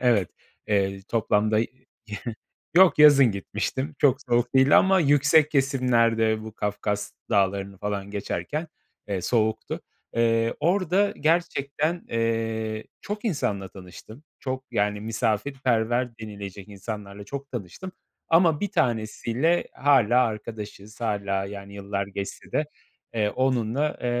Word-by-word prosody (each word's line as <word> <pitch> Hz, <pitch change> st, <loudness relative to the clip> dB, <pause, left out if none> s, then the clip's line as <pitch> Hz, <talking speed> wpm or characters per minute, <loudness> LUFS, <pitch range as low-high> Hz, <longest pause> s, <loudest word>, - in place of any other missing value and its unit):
Evet, 115 Hz, -8 st, +2 dB, 0.4 s
eee, 100 Hz, -2 st, +1 dB
toplamda 110 Hz, -1 st, +2 dB
Y 115 Hz, -, +1 dB, 1.1 s
yok, 185 Hz, -3 st, +7 dB
yazın 140 Hz, -5 st, +8 dB
gitmiştim. 130 Hz, +9 st, -3 dB
Çok 135 Hz, -2 st, +4 dB
soğuk 120 Hz, +1 st, +1 dB
değildi 135 Hz, +2 st, +6 dB
ama 190 Hz, 0 st, +5 dB
yüksek 150 Hz, +1 st, +4 dB
kesimlerde 115 Hz, -5 st, +2 dB
bu 110 Hz, 0 st, -8 dB
Kafkas 105 Hz, 0 st, -2 dB, 0.2 s
Dağları'nı 100 Hz, -1 st, +1 dB
falan 100 Hz, -1 st, -3 dB
geçerken, 105 Hz, -, -3 dB, 0.4 s
eee, 100 Hz, -2 st, -1 dB
soğuktu. 110 Hz, +2 st, 0 dB, 0.4 s
Eee, 115 Hz, 0 st, +2 dB
orada 190 Hz, +3 st, +2 dB
gerçekten, 155 Hz, 0 st, 0 dB
eee, 115 Hz, -1 st, -1 dB, 0.2 s
çok 210 Hz, +2 st, -5 dB
insanla 105 Hz, -, -1 dB
tanıştım. 95 Hz, -, -12 dB, 0.2 s
Çok, 130 Hz, 0 st, -4 dB
yani, 105 Hz, -2 st, 0 dB
misafirperver 115 Hz, +1 st, 0 dB
denilecek 100 Hz, -3 st, -8 dB
insanlarla 100 Hz, 0 st, -7 dB
çok 140 Hz, +5 st, -7 dB
tanıştım. 120 Hz, -, -7 dB, 0.4 s
Ama 165 Hz, -2 st, +4 dB
bir 205 Hz, -, 0 dB
tanesi 115 Hz, -, -1 dB
ile 160 Hz, +9 st, +2 dB
hâlâ 125 Hz, -3 st, +4 dB
arkadaşız, 110 Hz, -1 st, -7 dB
hâlâ 100 Hz, -3 st, -1 dB
yani 100 Hz, 0 st, -9 dB
yıllar 100 Hz, 0 st, -3 dB
geçse 100 Hz, 0 st, -7 dB
de, 155 Hz, -, +1 dB, 0.5 s
eee, 105 Hz, -2 st, +1 dB
onunla 130 Hz, +3 st, 0 dB
Eee, -, -, -1 dB
115 Hz, 120 wpm, -25 LUFS, 105-140 Hz, 1.1 s, yazın